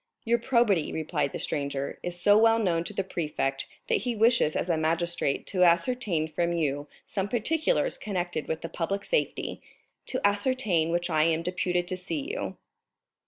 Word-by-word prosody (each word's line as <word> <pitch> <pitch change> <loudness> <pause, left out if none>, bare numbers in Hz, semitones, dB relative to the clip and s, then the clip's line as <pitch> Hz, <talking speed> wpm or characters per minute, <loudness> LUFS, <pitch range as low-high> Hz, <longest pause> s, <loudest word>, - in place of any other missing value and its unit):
"Your 235 +1 +2
probity," 230 - +2
replied 155 -3 -1
the - - -4
stranger, 140 -1 -3
"is 175 0 -4
so 205 +3 +5
well 225 +1 +5
known 175 -7 +1
to - - -4
the 195 - -1
prefect 150 -6 -2 0.2
that - - +2
he 245 -1 -2
wishes 225 -8 +3
as - - -1
a 170 - +2
magistrate 165 -2 0
to 185 -2 +1
ascertain 170 -1 +2
from 170 +2 -1
you 145 -3 -1 0.2
some 195 -1 -2
particulars 320 - +1
connected 175 -6 -3
with 160 - -3
the 165 - -4
public 185 +5 -3
safety, - - -1 0.5
to 255 - -1
ascertain 205 -6 +1
which 175 +1 0
I 155 -1 +3
am 165 0 +1
deputed 180 0 -1
to 185 - -3
see 170 -6 -4
you. 95 -1 -4
175 Hz, 170 wpm, -27 LUFS, 160-210 Hz, 0.5 s, so